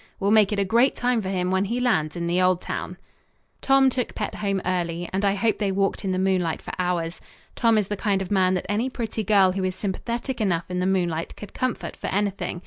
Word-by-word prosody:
We'll 200 +1 +1
make 215 -1 +5
it 210 - -1
a 200 - +1
great 235 +7 +3
time 245 -2 +1
for 190 - -4
him 180 -1 -1
when 190 +1 +2
he 235 +5 -2
lands 185 -12 +1
in 170 -1 -3
the 175 +2 +1
old 185 -1 +3
town." - - -5 0.6
Tom 270 0 +4
took 250 -1 -3
Pet 210 - -3
home 200 -2 -1
early, 175 -1 -1
and 195 +2 0
I 200 0 +2
hope 220 +2 0
they 200 -2 0
walked 195 +1 0
in 190 - -1
the 185 - 0
moonlight 185 -3 +1
for - - -8
hours. 175 -2 -1 0.3
Tom 230 -2 +3
is 210 -3 +1
the 205 - -2
kind 200 -1 0
of 190 0 -5
man 185 -2 +3
that 185 - -3
any 220 +6 0
pretty 225 -3 -3
girl 195 -2 +4
who 190 +1 -2
is 185 0 -1
sympathetic 235 +6 -3
enough 170 -5 +1
in 180 - -1
the 180 - +1
moonlight 175 -4 -1
could 210 - -10
comfort 255 -2 -3
for - - -6
anything. 195 -3 -1
195 Hz, 240 wpm, -24 LUFS, 185-215 Hz, 0.6 s, make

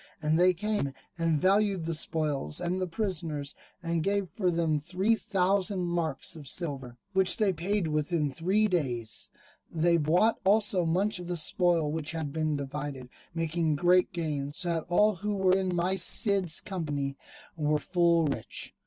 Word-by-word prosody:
And 155 +1 +1
they 180 +1 +6
came, 205 -7 -1 0.2
and 165 -3 +1
valued 195 0 +2
the 165 - -1
spoil 150 - -1
and 180 +2 -2
the 185 - -1
prisoners, 165 -7 -2 0.3
and 165 -1 0
gave 200 +1 0
for 185 -4 0
them 165 -3 +1
three 185 +8 +1
thousand 195 -2 0
marks 170 -3 -2
of 150 -4 -10
silver, 135 -7 -3 0.2
which 190 -1 +2
they 205 -3 +2
paid 185 +2 -1
within 150 -1 0
three 190 +9 +1
days: 125 - -2 0.4
they 170 +1 +3
bought 170 +9 +2
also 200 -3 +2
much 190 +4 +1
of 175 - -7
the 175 0 -2
spoil 165 -1 +1
which 155 0 -3
had 160 -3 -3
been 155 -1 0
divided, 140 -2 -5 0.3
making 165 -1 0
great 180 +5 +3
gain, 150 -5 -3
so 175 +1 -3
that 165 -2 -1
all 210 +3 +3
who 210 +3 -2
were 190 -1 +3
in 185 -2 0
my 180 +2 +1
Cid's 190 -2 +2
company 145 -8 -3 0.4
were 150 -1 +1
full 170 0 +2
rich. 140 - -4
170 Hz, 160 wpm, -29 LUFS, 155-190 Hz, 0.4 s, they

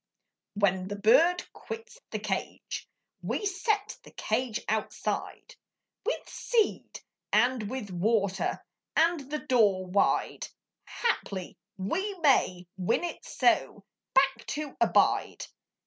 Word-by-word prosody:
When 190 -2 +2
the 205 - -4
bird 275 - +5
quits 455 +2 -8
the - - -3
cage, - - -4 0.3
We 415 - -2
set 405 +1 0
the - - -15
cage 235 +1 -1
outside, 220 0 -3 0.5
With - - -2
seed 455 -3 0 0.3
and 245 -4 +3
with 245 -6 -5
water, 200 +1 0 0.3
And 325 -4 +2
the 300 - -1
door 205 -7 +3
wide, 185 +2 +1 0.4
Haply 200 - -2 0.2
we 375 - -2
may 260 - +3
win 190 - +1
it 345 - -4
so - - +1 0.3
Back 270 0 +3
to 295 -1 -4
abide. - - +3
255 Hz, 110 wpm, -29 LUFS, -, 0.5 s, bird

